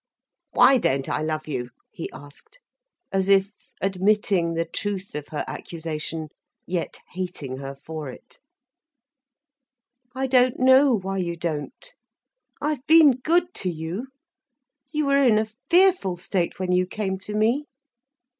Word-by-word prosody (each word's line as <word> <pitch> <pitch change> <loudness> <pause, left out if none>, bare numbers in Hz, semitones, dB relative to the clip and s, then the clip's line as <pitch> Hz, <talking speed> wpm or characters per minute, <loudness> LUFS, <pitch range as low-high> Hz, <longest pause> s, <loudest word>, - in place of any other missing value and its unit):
"Why 265 -1 +6
don't 135 - 0
I - - -1
love 155 0 -2
you?" 125 -5 -3 0.2
he 165 - -6
asked, 145 - -13 0.5
as 195 0 0
if 195 0 +4 0.3
admitting 190 -3 +1
the 165 0 0
truth 200 +2 -4
of 150 -1 -5
her 150 - -4
accusation, 160 -1 -5 0.4
yet 175 -2 -3
hating 175 -8 -5
her 135 0 -7
for 150 +1 -7
it. - - -13 1.8
"I 265 +1 -1
don't 255 -1 +3
know 260 +2 +6
why 195 0 -3
you 170 -2 -2
don't—I've 265 - -6
been 315 -2 +8
good 340 +8 +1
to 185 - -1
you. 170 +9 -5 0.8
You 305 -1 0
were 280 0 +3
in 230 -5 +5
a 215 - +2 0.2
fearful 355 - +4
state 175 0 -2
when 185 -1 -2
you 180 0 +2
came 190 -1 -3
to 210 +2 -6
me." 235 +7 +2
190 Hz, 135 wpm, -24 LUFS, 160-255 Hz, 1.8 s, been